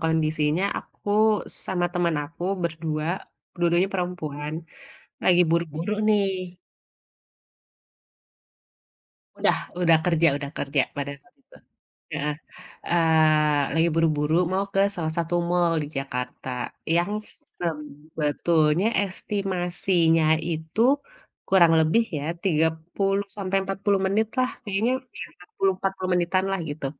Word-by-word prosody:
kondisinya, 155 +1 +1
aku - - -11 0.6
sama 175 -2 0
teman 175 -3 +1
aku 165 +3 -11 0.2
ber-2, 160 -2 -2 0.5
dua-duanya 175 +2 +2
perempuan, 155 -5 -3 0.7
lagi 180 -1 +5
buru-buru 170 +2 -1 0.2
nih 190 -4 0 2.8
Udah - - +3 0.3
udah 165 -2 +6
kerja 165 -1 +4
udah 140 -1 -6
kerja, 140 0 +1 0.2
pada 140 0 -3
saat 180 - -26
itu. 275 - -22 0.6
Heeh, 150 +1 -1 0.6
eee, 155 -3 +4
lagi 165 +1 +3
buru-buru 155 -2 +1 0.2
mau 195 +1 +1
ke 195 - +3
salah 160 -3 -2
satu 170 +1 -1 0.2
mall 175 -1 +2
di - - -4
Jakarta, 125 -1 -5 0.5
yang 175 +3 +2 0.3
sebetulnya 155 +2 -1 0.2
estimasinya 180 -4 0 0.3
itu, 160 +5 -4 0.7
kurang 175 -4 +6
lebih 160 +9 +3
ya, 140 - -5 0.2
30 175 +4 0
sampai 195 -1 -1
40 195 +1 0
menit 210 +3 +2
lah 255 0 +2
kayaknya, 210 +3 0 0.3
ya - - -3
empat 180 - -19
puluh 195 0 +3
empat 195 0 0
puluh 185 -1 -3
menitan 180 +2 +1
lah, 195 - 0
gitu. 145 -1 -4
170 Hz, 115 wpm, -25 LUFS, 155-185 Hz, 2.8 s, udah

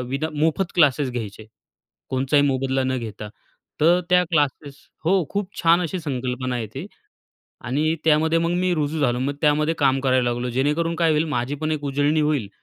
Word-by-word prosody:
विना 140 +5 -2
मोफत 165 +4 0
क्लासेस 145 -5 +3
घ्यायचे, 110 -3 -6 0.6
कोणचाही 135 +2 +2
मोबदला 135 -1 0
न 130 0 -1
घेता. 110 -2 -7 0.5
तर 170 +4 +4
त्या 180 0 +5
क्लासेस 145 -2 0 0.3
हो 170 - +2 0.2
खूप 200 -2 -2
छान 170 +1 +4
अशी 180 +1 -3
संकल्पना 130 -3 -3
आहे 120 -2 -3
ती 140 +8 -6 0.8
आणि 150 +6 0
त्यामध्ये 160 +1 +3
मग 170 +1 0
मी 185 0 +1
रुजू 155 0 -2
झालो, 125 -4 +1
मग 140 +3 -2
त्यामध्ये 150 +1 +2
काम 135 -2 +3
करायला 130 -2 +2
लागलो, 120 +1 -3
जेणेकरून 150 +7 0
काय 165 -1 +2
होईल, 155 0 +2
माझी 130 0 -2
पण 155 +1 -3
एक 145 -2 -3
उजळणी 145 +3 +1
होईल 145 -9 0
145 Hz, 175 wpm, -22 LUFS, 130-160 Hz, 0.8 s, त्या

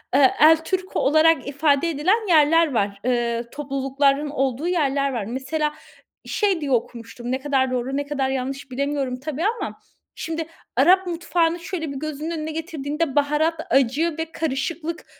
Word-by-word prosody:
Eee, 270 -1 +6
"El 320 +1 +8
Turco" 375 +1 -2
olarak 310 0 +3
ifade 285 +2 +2
edilen 370 +9 +1
yerler 320 -2 +4
var, 200 -2 -1
eee, 240 -1 0
toplulukların 275 +1 0
olduğu 270 +2 -1
yerler 280 -5 +1
var. 230 -5 -2
Mesela 270 +6 -2 0.5
şey 390 -6 0
diye 280 -2 -3
okumuştum, 240 0 -3
ne 260 - 0
kadar 265 -2 +1
doğru, 255 +2 -2
ne 285 - -2
kadar 275 -2 -1
yanlış 270 +1 -4
bilemiyorum 275 -1 -2
tabii 305 +3 -4
ama 465 +2 -2 0.4
şimdi 325 0 -4 0.3
Arap 375 0 +5
mutfağını 340 0 0
şöyle 335 -4 -4
bir - - -7
gözünün 310 +1 -4
önüne 315 -1 -4
getirdiğinde 310 -2 -3
baharat, 300 +3 +2 0.2
acı 275 +6 +2
ve 325 0 -4
karışıklık 320 +3 -3
290 Hz, 150 wpm, -23 LUFS, 265-325 Hz, 0.5 s, El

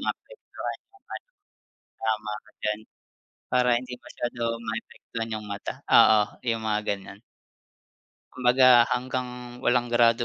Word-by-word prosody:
maapektuhan - - -6
yung 395 - -24
ano. - - -8 0.7
Tama 110 -1 -2
ka 110 - -21
diyan, 105 0 -1 0.7
para 125 0 +3
hindi 125 0 -8
masyado 120 0 -6 0.2
maapektuhan 115 0 -5
yung 105 -1 -5
mata, 100 0 -4 0.2
oo, 110 -1 +7 0.2
yung 115 -1 0
mga 105 -1 +1
ganyan. 100 0 -4 1.1
Kumbaga, 125 -1 +6
hanggang 125 -1 -4
walang 120 -1 +1
grado 120 0 +4
120 Hz, 115 wpm, -26 LUFS, 110-125 Hz, 1.1 s, oo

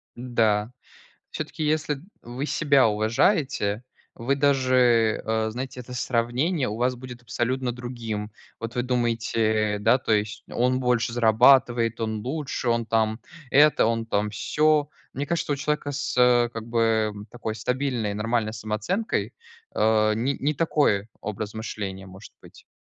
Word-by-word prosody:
Да. 115 -3 0 0.6
Всё-таки, 155 - -5
если 150 -2 0 0.2
вы 125 +4 -5
себя 140 -5 +3
уважаете, 110 - +1 0.3
вы 135 +4 -1
даже 130 -5 +3
э, 110 0 0
знаете, 125 +2 -6
это 125 0 -9
сравнение 125 +6 0
у 105 - -3
вас 125 +2 0
будет 125 0 -10
абсолютно 125 +1 -2
другим. 115 -4 -5 0.3
Вот 115 +1 -5
вы 125 - +1
думаете, 115 -3 0
да, 125 +5 +3
то 115 - -3
есть, 105 0 0
он 125 +1 +1
больше 120 -3 +1
зарабатывает, 120 0 +4
он 110 -1 -2
лучше, 135 +1 -4
он 115 -1 +1
там 110 0 0 0.3
это, 150 -2 +5
он 115 0 0
там 105 -1 -1
сё. 150 +7 +1 0.2
Мне 140 - -3
кажется, 170 -2 0
что 145 - 0
у - - 0
человека 150 0 -2
с, 140 -2 -3
э, 120 -1 +5
как 115 -2 -7
бы 115 -2 +1 0.2
такой 115 -2 -4
стабильной, 125 -2 -1
нормальной 110 +1 -1
самооценкой, 110 - -2 0.4
э, 110 0 +3
не 125 +5 0
не 150 +2 0
такой 140 -11 +1
образ 105 0 -5
мышления 100 -3 -5
может 95 +3 -13
быть. - - -17
120 Hz, 145 wpm, -25 LUFS, 110-130 Hz, 0.6 s, это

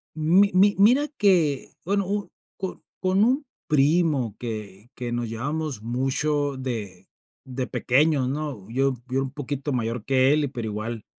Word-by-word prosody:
Mi 175 +6 +4
mi 200 +2 +5
mira 250 +9 +5
que, 170 -9 +2
bueno, 200 +1 0
u 205 0 -2 0.3
co 190 -2 -5 0.2
con 190 +2 +2
un 265 +6 +2 0.2
primo 150 - +2
que 110 -2 -6
que 120 -1 -4
nos 120 -1 -2
llevábamos 140 +2 -3
mucho 135 +4 0
de 105 -8 -5 0.4
de 130 -1 -4
pequeños, 140 +1 +2
¿no? 140 -8 -4
Yo 135 +3 +1
yo 130 +1 0
era - - +1
un 130 - -5
poquito 145 0 -4
mayor 115 -2 -2
que 135 +1 +4
él, 150 -2 +1
pero 120 -4 -4
igual, 110 +1 -5
135 Hz, 155 wpm, -25 LUFS, 120-160 Hz, 0.4 s, mi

